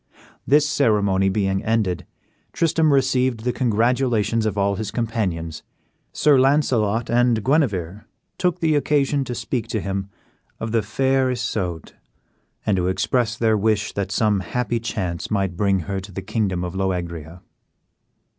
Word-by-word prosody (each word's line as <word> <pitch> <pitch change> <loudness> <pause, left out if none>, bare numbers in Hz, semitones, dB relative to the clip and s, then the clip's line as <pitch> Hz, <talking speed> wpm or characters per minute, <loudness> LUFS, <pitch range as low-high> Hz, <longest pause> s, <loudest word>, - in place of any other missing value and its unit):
This 150 +2 +4
ceremony 100 -9 +2
being 95 -1 0
ended, 105 -6 0 0.5
Tristram 160 -1 +2
received 130 -3 +2
the 125 +1 -1
congratulations 115 -1 +1
of 105 - -3
all 100 0 +1
his 110 -2 -3
companions. 95 -9 -2 0.5
Sir 145 -3 +4
Launcelot 120 -5 +2
and 120 -2 +2
Guenever 105 - 0 0.3
took 180 -1 0
the 160 -2 +2
occasion 145 -1 +1
to 120 - -4
speak 115 0 -3
to 110 -1 -2
him 95 0 -3 0.5
of 110 - -4
the 115 -1 +2
fair 130 +5 +1
Isoude, 110 -9 -3 0.7
and 105 - +2
to 90 0 0
express 115 +4 0
their 110 -1 +2
wish 105 0 0
that 100 -1 -3
some 105 -3 +2
happy 120 +6 -2
chance 95 -7 -3
might 95 -4 -1
bring 100 0 +1
her 95 +3 -3
to 95 +2 -10
the 95 +1 -6
kingdom 95 -3 -1
of 90 0 -4
Loegria. 90 -3 -3
110 Hz, 145 wpm, -22 LUFS, 95-125 Hz, 0.7 s, This